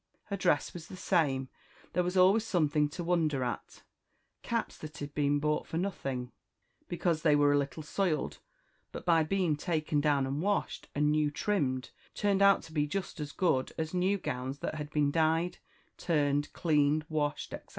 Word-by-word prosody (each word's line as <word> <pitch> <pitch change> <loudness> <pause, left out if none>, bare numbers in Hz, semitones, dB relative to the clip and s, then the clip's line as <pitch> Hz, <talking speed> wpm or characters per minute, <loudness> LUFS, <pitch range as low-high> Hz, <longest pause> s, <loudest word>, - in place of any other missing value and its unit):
Her 200 - -4
dress 175 -6 +1
was 170 -2 -8
the - - -9
same; 145 -8 +1 0.5
there 180 - +2
was 180 +1 -1
always 190 +4 +5
something 150 -8 +1
to 175 +4 -5
wonder 160 -6 +1
at; 120 - -5 0.6
caps - - -2
that 155 0 -8
had 145 0 -6
been 145 0 +2
bought 150 +1 0
for 160 - -3
nothing, 135 -9 -3 0.6
because 170 -2 0
they 155 -2 +4
were 145 0 +4
a - - +4
little 140 +3 -4
soiled, 165 0 -1 0.5
but - - -8
by 165 -2 +5
being 175 -1 +1
taken 155 -1 0
down 145 -2 +2
and 135 +3 -2
washed, 205 +2 -1
and 150 +1 +3
new 150 -1 +2
trimmed, 145 -6 -1 0.2
turned 200 -1 +1
out 200 0 +6
to 165 - -12
be 150 -1 +1
just 190 +1 -4
as 145 -1 -4
good 140 -6 +1
as 160 +1 -3
new 185 +2 +2
gowns 130 -5 -4
that - - -4
had 150 -1 -5
been 145 -1 +1
dyed, 165 +2 +1 0.4
turned, 145 -3 +1
cleaned, 150 -1 +2
washed, 150 -2 -2
etc. - - -8
155 Hz, 180 wpm, -31 LUFS, 145-175 Hz, 0.6 s, out